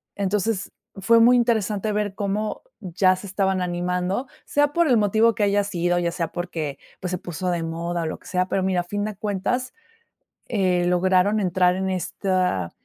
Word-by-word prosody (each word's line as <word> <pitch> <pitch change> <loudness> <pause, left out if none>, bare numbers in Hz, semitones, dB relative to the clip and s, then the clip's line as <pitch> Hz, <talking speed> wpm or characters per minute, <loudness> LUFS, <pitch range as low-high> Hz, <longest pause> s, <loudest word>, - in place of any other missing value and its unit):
Entonces, 200 +1 -1 0.3
fue 230 +4 +4
muy 240 +2 +6
interesante 215 -3 +1
ver 205 -1 -1
cómo 210 +1 -2 0.2
ya 185 0 +2
se 200 - -9
estaban 190 -1 0
animando, 180 +6 -1 0.2
sea 290 0 +2
por 340 -1 +3
el 250 - +4
motivo 220 +2 +3
que 215 - 0
haya 205 0 +2
sido, 175 -2 0
ya 170 -1 0
sea 165 -3 -3
porque, 165 -5 -4 0.2
pues, 180 0 -3
se 180 - -1
puso 175 +1 -4
de 170 -1 -1
moda 170 +1 -3
o - - -3
lo 160 - -4
que - - -17
sea, 180 0 0
pero, 190 - 0
mira, 185 -1 +1
a - - -8
fin 205 +3 -3
de 215 -1 -4
cuentas, 215 +5 -2 0.8
eh, 185 -5 +1
lograron 185 +3 +3
entrar 180 -1 +2
en 190 0 -1
esta 185 - -1
190 Hz, 185 wpm, -23 LUFS, 180-210 Hz, 0.8 s, muy